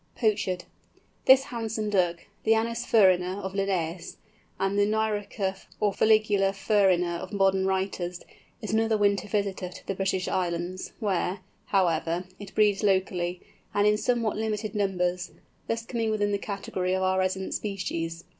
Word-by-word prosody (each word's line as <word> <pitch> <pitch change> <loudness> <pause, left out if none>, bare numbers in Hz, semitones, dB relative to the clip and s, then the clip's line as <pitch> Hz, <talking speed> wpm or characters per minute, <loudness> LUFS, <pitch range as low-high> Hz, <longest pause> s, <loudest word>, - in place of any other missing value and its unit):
POCHARD. 205 -5 0 0.6
This 265 0 +7
handsome 220 -4 -3
Duck, 175 -4 +1 0.2
the 225 0 +4
Anas 230 +2 -1
ferina 185 -3 +4
of 190 0 -4
Linnæus, 185 -4 -2 0.4
and 195 +1 0
the 205 0 +3
Nyroca 210 -3 -1
or 205 -2 +2
Fuligula 210 -3 +3
ferina 190 -4 +2
of - - -7
modern 195 -1 +2
writers, 190 -2 -2 0.4
is 215 - -3
another 220 0 +2
winter 200 -2 +2
visitor 200 -3 -1
to 180 - -12
the - - -2
British 190 -1 -1
Islands, 175 0 -2
where, 190 -3 -1 0.3
however, 170 -2 +1 0.2
it 205 -2 -10
breeds 205 -2 +3
locally, 185 -3 0 0.3
and 205 0 +3
in 210 0 +5
somewhat 230 -1 0
limited 215 -1 -2
numbers, 180 -3 0 0.4
thus 230 0 -2
coming 230 -2 -1
within 205 -1 +1
the 200 - 0
category 190 -2 -2
of 190 - 0
our 190 0 +2
resident 190 0 -1
species. 170 -5 -3
195 Hz, 145 wpm, -27 LUFS, 185-215 Hz, 0.6 s, This